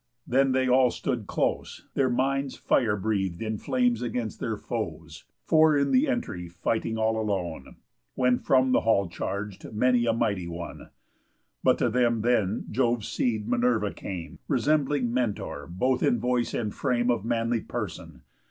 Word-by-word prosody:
Then 135 +2 +3
they 130 0 +2
all 130 0 +5
stood 115 -3 -3
close, - - -2
Their 135 -2 +2
minds 135 +2 0
fire 110 -5 +2
breath'd 95 -4 -1
in 110 -2 -3
flames 125 -3 +1
against 120 -3 -3
their - - -2
foes, - - -6 0.2
Four 155 -1 +5
in 140 0 +1
th' 260 +4 +4
entry 240 - -2
fighting 110 +6 -2
all 110 0 +1
alone; 90 -9 -3 0.4
When 125 -1 +2
from 130 -1 +3
the - - +4
hall 100 -4 +2
charg'd 100 +3 -5
many 120 +1 +3
a - - +4
mighty 100 -6 -1
one. 85 0 -7 0.7
But - - +4
to - - +1
them 120 -2 +2
then 110 -5 +1
Jove's 120 -2 0
seed, 110 -4 -1
Minerva, 120 -4 +1
came, 85 -3 -7
Resembling 140 -2 +1
Mentor 105 - -2
both 125 +10 0
in 120 - +3
voice 125 -1 0
and 110 -3 -2
frame 120 -1 +1
Of 115 -4 -1
manly 115 0 0
person. - - -6
120 Hz, 155 wpm, -27 LUFS, 105-130 Hz, 0.7 s, all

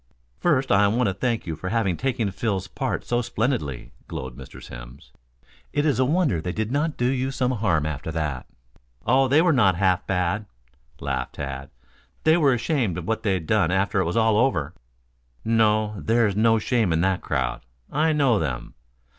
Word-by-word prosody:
"First 140 -6 +1
I 100 +1 +5
want 115 +1 +1
to - - -1
thank 115 +3 -1
you 80 -3 -3
for 95 +4 -5
having 105 -5 +1
taken 120 -2 -1
Phil's 100 -3 -2
part - - -3
so 120 0 0
splendidly," 110 - -2 0.2
glowed 65 -2 -6
Mr. - - -11
Simms. - - -11 0.6
"It 145 - +1
is 140 -5 +2
a 130 - +4
wonder 145 - +1
they 90 +2 -3
did 110 +2 -2
not 150 +3 0
do 120 - 0
you 130 +1 0
some 130 -1 0
harm 100 - +1
after 75 +1 -4
that." 75 -5 -3 0.6
"Oh, 130 +4 +4
they 145 +5 +4
were 175 -2 +4
not 100 -8 +4
half 90 -1 +1
bad," 95 +3 -1 0.5
laughed - - -3
Tad. 70 -1 -5 0.5
"They 160 +1 +5
were 145 -6 +4
ashamed 120 - 0
of 85 - -6
what 110 0 -1
they'd 95 -6 -1
done 100 -3 +2
after 95 +2 +1
it 95 - +1
was 85 +6 -1
all 110 -2 +3
over." 85 - +1 0.7
"No. 110 -1 +2
There's 115 -3 +2
no 115 +1 +4
shame 110 -3 +1
in 80 0 +2
that 95 0 +1
crowd. 65 -2 -2 0.3
I 155 +3 +2
know 135 -8 +3
them. 65 -6 -4
110 Hz, 185 wpm, -24 LUFS, 90-125 Hz, 0.7 s, I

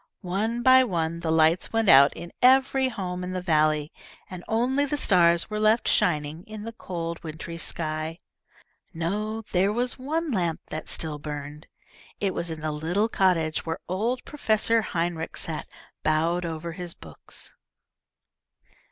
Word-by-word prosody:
One 220 +6 -1
by 260 +1 +7
one 170 -6 -1
the 170 -1 -3
lights 160 +2 +3
went 225 -1 +1
out 140 -3 +8
in 175 - -9
every 265 +1 +4
home 180 -5 -4
in 180 0 -4
the 185 - -1
valley, 155 -3 +2 0.4
and 180 -1 -7
only 250 +5 +1
the 285 +1 -1
stars 170 -7 +4
were 215 - -2
left 215 +2 +3
shining, 155 0 +1
in 215 -2 -8
the 230 - -5
cold 170 -6 -5
wintry 165 +1 -7
sky. 155 +1 -3 0.8
No, 210 +7 -2
there 190 +2 +2
was 245 +4 -1
one 315 +4 -2
lamp 175 -7 0
that 155 - -5
still 155 -2 0
burned. 150 0 -7 0.5
It 195 -2 0
was 170 - -2
in 160 -1 -6
the 155 0 -1
little 175 +9 0
cottage 170 -7 +1
where 165 0 -3
old 225 +8 -1
Professor 225 -5 +2
Heinrich 170 -4 -3
sat 160 -2 -3 0.4
bowed 165 +3 +1
over 165 0 -4
his 175 0 -6
books. 75 -3 -7
175 Hz, 150 wpm, -26 LUFS, 160-220 Hz, 0.8 s, out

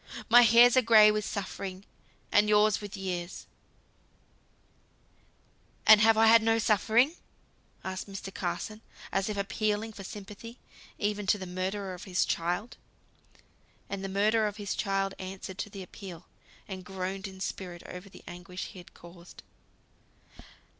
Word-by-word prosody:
My 240 +2 +9
hairs 240 +1 +7
are 255 - +6
gray 215 -2 +7
with 210 -1 -2
suffering, 195 -1 -5 0.5
and 210 +1 +4
yours 210 0 +4
with 205 -1 -7
years 180 -2 -5 1.0
" - - -37
"And 215 -1 +8
have 225 0 +5
I 225 - +6
had 225 +1 +7
no 225 0 +2
suffering?" 225 - +3 0.7
asked 190 +1 -5
Mr. 195 0 -7
Carson, 190 +5 -4 0.3
as 195 +2 0
if 210 - -3
appealing 215 +2 -1
for 200 - -9
sympathy, 210 +4 -9 0.4
even 205 -1 -2
to 210 - +3
the 190 - -7
murderer 185 +2 -3
of 180 - -9
his 185 -2 +1
child. 175 +7 -2 1.1
And 195 -1 -4
the 195 - -3
murderer 215 +3 +2
of 205 0 -6
his 205 -3 -3
child 195 -1 -1
answered 190 0 -7
to - - -3
the 195 -2 -8
appeal, 180 -2 -10 0.4
and 185 -2 -7
groaned 190 +1 -5
in 190 -1 -11
spirit 180 -2 -6
over 180 +2 -9
the - - -15
anguish 180 +1 -7
he 185 - -11
had 175 - -15
caused. 170 0 -14
195 Hz, 150 wpm, -29 LUFS, 185-215 Hz, 1.1 s, My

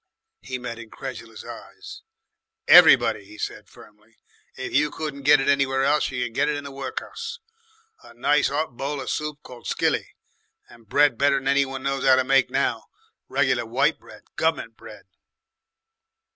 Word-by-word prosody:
He 130 0 -5
met 120 -2 -7
incredulous 115 -1 -9
eyes. - - -11 0.7
"Everybody," - - +7
he 105 +2 -15
said - - -6
firmly. 105 +1 -19 0.4
"If 130 - -6
you 150 +2 +3
couldn't 150 -2 -6
get 145 +1 +5
it 135 - -2
anywhere 135 -1 +2
else, 145 +2 +2
you 125 -2 -2
could 115 - -7
get 145 +4 +1
it 150 - 0
in 145 - -6
the 140 - -8
workhuss, 455 - -6 0.6
a - - -16
nice 145 +5 +2
'ot 145 -3 -2
bowl 140 +3 -4
of 130 - -4
soup 150 -1 -4
called 125 -2 -11
skilly, - - -1 0.5
and 115 -3 -19
bread 145 -5 +3
better'n 140 -1 +2
any 140 0 +3
one 135 0 -7
knows 135 0 -2
'ow 130 -1 +6
to 130 - +2
make 135 0 +3
now, - - -1 0.4
reg'lar - - +1
white - - +1
bread, - - -15
gov'ment - - -1
bread." - - -13
135 Hz, 165 wpm, -24 LUFS, 125-145 Hz, 0.7 s, Everybody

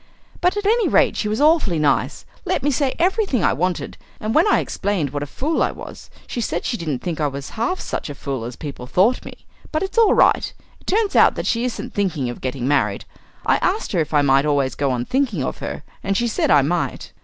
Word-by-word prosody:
But 360 +3 +1
at 410 - -3
any 455 +2 +3
rate - - +3
she 210 - -1
was 215 +1 -1
awfully 295 - +3
nice 150 -1 0 0.2
let - - -1
me 290 - +2
say 270 0 0
everything 360 - +1
I - - +3
wanted, 180 +2 -2 0.2
and 215 +1 -2
when 320 +6 +4
I - - +4
explained 185 -9 -1
what 145 0 -3
a 145 - -4
fool 295 - -1
I - - +3
was, - - -10 0.2
she 240 - -4
said - - -2
she 240 - -1
didn't 155 - -4
think 165 -3 -3
I 150 - +2
was 140 0 -6
half 235 +12 -1
such - - -4
a 145 - -6
fool 135 -4 -4
as 120 +1 -6
people 140 -4 -7
thought 205 - +2
me. - - -12 0.3
But 310 +2 0
it's 390 +4 -1
all 445 -3 +5
right. - - +3 0.3
It - - -26
turns 415 +1 +1
out - - +6
that - - -4
she 235 +1 0
isn't 250 - -5
thinking 170 -11 -1
of - - -10
getting 130 -1 -3
married. 145 +1 +1 0.4
I - - +4
asked 400 +5 -1
her 180 - +1
if 155 - -1
I 145 -2 +3
might 135 +1 +3
always 140 -3 +1
go 140 -1 -1
on 125 -1 -1
thinking 245 - 0
of - - -4
her, - - -5 0.2
and 195 0 0
she 240 - +1
said 225 - 0
I 145 -4 +6
might." 170 +4 -2
185 Hz, 240 wpm, -21 LUFS, -, 0.4 s, out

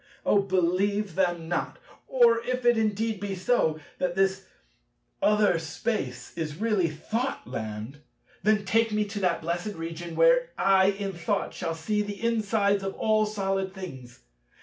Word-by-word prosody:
Oh, 200 - +4
believe 195 +1 +1
them 175 -2 0
not. 175 - -2 0.3
Or 235 -3 +4
if 255 0 -2
it 240 0 +6
indeed 220 -1 0
be 200 0 -3
so, 180 -5 +1 0.2
that 180 -1 -1
this 195 0 +1 0.7
other 210 -4 +3
Space 160 - -4
is 160 -3 -3
really 210 -3 +1
Thoughtland, 135 - -4 0.4
then 210 -1 +2
take 225 +3 +2
me 210 0 +1
to 205 0 -5
that 180 -4 0
blessed 175 +5 -3
Region 165 +1 -6
where - - +4
I 190 -1 +4
in 195 0 -1
Thought 190 +4 -2
shall 165 -1 -3
see 210 +6 -1
the 205 -1 -5
insides 215 -3 +1
of 195 0 -3
all 215 -1 +2
solid 195 -2 -2
things. 130 -10 -9
195 Hz, 150 wpm, -27 LUFS, 170-215 Hz, 0.7 s, it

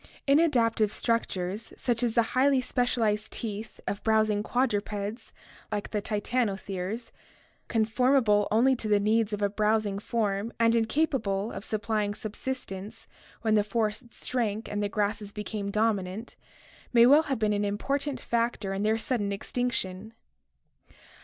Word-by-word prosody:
— - - -30
Inadaptive 230 -9 +3
structures 210 -4 -1
such 240 -2 0
as 235 -2 0
the 235 - +5
highly 265 +1 +4
specialized 230 -4 0
teeth 215 -1 -5
of 200 - -3
browsing 215 -2 +3
quadrupeds 210 -2 -2 0.4
like 205 -1 -3
the 210 - -1
titanotheres, 205 -1 -2 0.6
con 225 -2 +2
formable 230 -3 +3
only 250 +5 +4
to 225 - -4
the 210 -1 +4
needs 220 +1 +2
of 210 0 -2
a 200 - +3
browsing 210 -1 +1
form 210 0 -1
and 230 0 +4
incapable 225 -4 0
of 195 - -6
supplying 215 -1 -1
subsistence 215 -3 -6 0.4
when 220 -1 +2
the 210 -1 +4
forests 215 +3 -2
shrank 220 -4 -1
and 205 0 -2
the 205 - 0
grasses 210 -1 -1
became 210 -1 -4
dominant, 210 0 -1 0.6
may 235 -1 +7
well 285 +5 +7
have 280 -4 -2
been 215 -1 +1
an 205 0 0
important 275 +8 -1
factor 230 -4 -1
in 195 - -2
their 215 +1 +2
sudden 220 -2 -1
extinction. 215 -2 -3
215 Hz, 140 wpm, -28 LUFS, 205-235 Hz, 0.6 s, may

